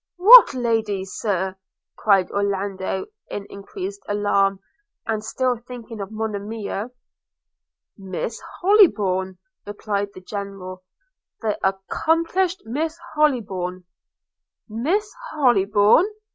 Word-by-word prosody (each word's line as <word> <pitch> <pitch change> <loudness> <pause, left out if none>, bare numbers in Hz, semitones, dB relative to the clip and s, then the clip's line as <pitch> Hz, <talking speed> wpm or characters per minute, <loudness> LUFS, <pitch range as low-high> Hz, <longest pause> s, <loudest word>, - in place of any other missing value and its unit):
'What 415 - +9
lady, 225 -5 -1
Sir?' 190 -1 -2 0.4
cried 195 -4 +2
Orlando, 195 -1 -2 0.2
in 200 - -5
increased 380 - -7
alarm, 200 -1 +1 0.5
and 220 -2 -2
still 250 +2 -1
thinking 235 -2 -9
of 195 - -5
Monimia. 215 0 -4 1.1
'Miss 195 +4 -5 0.2
Hollybourn,' 200 - +3 0.3
replied 205 -1 -3
the 185 - -10
General 195 -2 -7 0.3
– - - -55
'the 215 -2 0
accomplished 330 - 0
Miss 315 +8 -3 0.2
Hollybourn.' 195 -12 0 0.8
'Miss 330 - -1 0.2
Hollybourn!' 215 - +4
210 Hz, 90 wpm, -22 LUFS, 195-255 Hz, 1.1 s, What